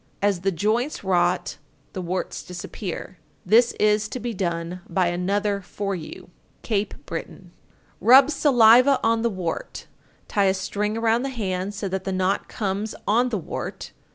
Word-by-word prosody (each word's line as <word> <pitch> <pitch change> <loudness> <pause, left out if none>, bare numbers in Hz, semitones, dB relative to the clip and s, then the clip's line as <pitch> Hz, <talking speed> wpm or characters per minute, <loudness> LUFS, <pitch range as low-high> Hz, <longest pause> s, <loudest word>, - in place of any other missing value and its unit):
As 200 -3 +1
the 195 +1 +1
joints 220 - -1
rot, 180 -3 +1 0.4
the 185 - -4
warts 180 +1 -3
disappear. 180 +1 -7 0.3
This 230 +5 +4
is 210 0 +2
to 255 - -5
be 240 -1 -4
done 175 -2 -3
by 175 0 +1
another 200 +3 -1
for 195 +2 -4
you. 175 0 -8 0.3
Cape 205 -2 -1
Breton. 170 +2 -7 0.5
926. - - -11
Rub 265 +4 +8
saliva 255 -2 +5
on 225 0 +2
the 235 - +1
wart, 185 -5 -5 0.4
tie 200 -1 +1
a 190 0 +3
string 210 +3 -2
around 225 +1 +2
the 275 - -2
hand 200 -5 -3
so 200 - -3
that 190 0 -3
the 190 - -3
knot 185 +1 0
comes 205 +1 -3
on 240 +4 +3
the 225 - -1
wart. 175 - -6
200 Hz, 160 wpm, -24 LUFS, 185-225 Hz, 0.5 s, Rub